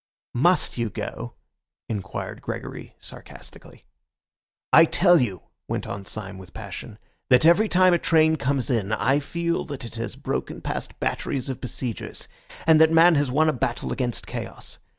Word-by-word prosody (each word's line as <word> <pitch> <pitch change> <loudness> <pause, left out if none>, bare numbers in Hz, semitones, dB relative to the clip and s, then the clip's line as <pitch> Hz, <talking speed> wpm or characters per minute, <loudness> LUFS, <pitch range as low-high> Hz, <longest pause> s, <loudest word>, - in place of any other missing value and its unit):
"Must 170 +1 +2
you 115 -1 0
go?" - - -6 0.5
inquired 100 -3 -5
Gregory - - -7
sarcastically. - - -13 0.9
"I 165 - +9
tell 175 -1 +4
you," 95 -8 -2 0.2
went - - -3
on 100 -1 -6
Syme 100 -3 -3
with 95 -1 -14
passion, 105 +1 -8 0.3
"that 125 +3 +5
every 200 +6 +5
time 185 0 +5
a 175 - +3
train 160 -1 +4
comes 140 -1 -1
in 110 -3 0
I 135 +5 +2
feel 170 +3 -2
that 140 -5 -6
it 115 - -9
has 115 - -4
broken - - -4
past - - -5
batteries 135 -1 -2
of 130 - -5
besiegers, 125 -2 -5 0.4
and 160 -1 +6
that 160 0 +6
man 165 +2 +7
has 145 -3 +1
won 155 +5 +3
a 155 - +3
battle 120 -1 -2
against 125 -3 -3
chaos. - - -7
135 Hz, 160 wpm, -24 LUFS, 115-160 Hz, 0.9 s, I